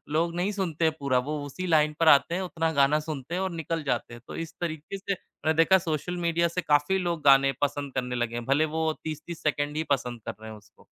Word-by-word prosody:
लोग 170 +1 +1
नहीं 180 +4 0
सुनते 170 -5 0
पूरा। 140 -3 +1
वो 150 -1 -2
उसी 185 +6 -5
लाइन 155 -2 +3
पर 165 - +3
आते 155 +3 +6
हैं, 185 - -1
उतना 165 -3 -1
गाना 140 +2 +4
सुनते 155 -1 -6
हैं 185 - -1
और 190 -1 -1
निकल 165 -1 -3
जाते 120 -4 -2
हैं, 120 - -10
तो - - -7
इस 165 -1 -5
तरीके 160 +2 -4
से 200 +1 -2 0.3
मैं 160 - +3
देखा 165 +4 +5
सोशल 175 0 -3
मीडिया 170 +1 +2
से 170 +2 -2
काफ़ी 145 +4 +2
लोग 175 -3 -2
गाने 135 -1 +6
पसंद 145 -1 -1
करने 125 -1 -2
लगे 120 -1 -2
हैं, 120 -1 -4
भले 145 +4 +3
वो 160 0 +1
30-30 160 +2 -6
सेकंड 145 -1 0
ही 160 - 0
पसंद 125 -3 -3
कर - - -4
रहे 110 - -8
हैं 110 - -9
उसको। 105 - -22
155 Hz, 240 wpm, -27 LUFS, 140-170 Hz, 0.3 s, आते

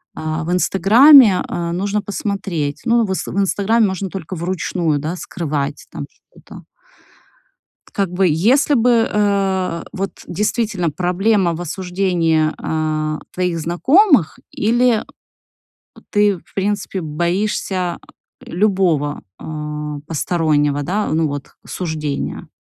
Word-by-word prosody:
А 155 +1 -3
в 170 - -2
"Инстаграме", 215 +4 +6
э, 170 -1 -3
нужно 200 +4 -1
посмотреться, 195 -6 -3
ну, 235 -1 +4
в - - -7
инста, 190 - -3
в - - -5
"Инстаграм" 205 +3 +2
можно 190 0 -2
только 185 -1 -6
вручную, 170 -2 -1
да, 155 +4 -3
скрывать 150 -5 -4
там - - -6
что-то. - - -16 1.3
Как 195 -4 -1
бы 185 +1 +2
если 225 - +3
бы, 235 -1 +3
э, 195 -4 0
вот 195 +1 -3 0.2
действительно 205 -2 -1
проблема 180 +3 +1
в 170 - -6
осуждении, 175 -3 0
э, 155 -1 -2
твоих 180 -2 -1
знакомых 260 - +3
или 235 +1 +2 1.1
ты, 205 -2 +3
в - - -22
принципе, 195 -1 -2
боишься 175 +2 -2 0.5
любого, 175 -7 0 0.2
э, - - -12 0.6
постороннего, 150 -3 0
да, 200 +8 -1
ну, 160 0 +2
вот, 145 -1 -6
осуждения? 155 -5 -4
185 Hz, 115 wpm, -18 LUFS, 160-205 Hz, 1.3 s, Инстаграме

